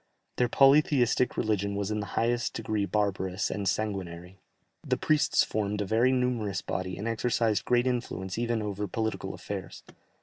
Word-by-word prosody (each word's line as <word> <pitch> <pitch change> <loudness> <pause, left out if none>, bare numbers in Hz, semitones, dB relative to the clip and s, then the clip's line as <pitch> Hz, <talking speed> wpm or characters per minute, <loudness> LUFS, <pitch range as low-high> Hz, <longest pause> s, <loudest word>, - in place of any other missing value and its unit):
Their 125 -1 +2
polytheistic 135 -2 +4
religion 100 -2 0
was 100 +1 -2
in 105 - -1
the 100 - -4
highest 120 +1 +1
degree 105 -2 -1
barbarous 100 -2 -1
and 100 -2 -1
sanguinary; 95 -3 -4 0.4
the - - 0
priests 155 -1 +3
formed 105 -1 -2
a 105 - -1
very 115 +5 +3
numerous 120 -7 0
body, 95 -1 -3
and 105 - -4
exercised 115 -2 0
great 120 0 +3
influence 120 -7 -2
even 115 -1 -1
over 105 0 -3
political 110 +3 -3
affairs. - - -7
105 Hz, 155 wpm, -28 LUFS, 100-120 Hz, 0.4 s, polytheistic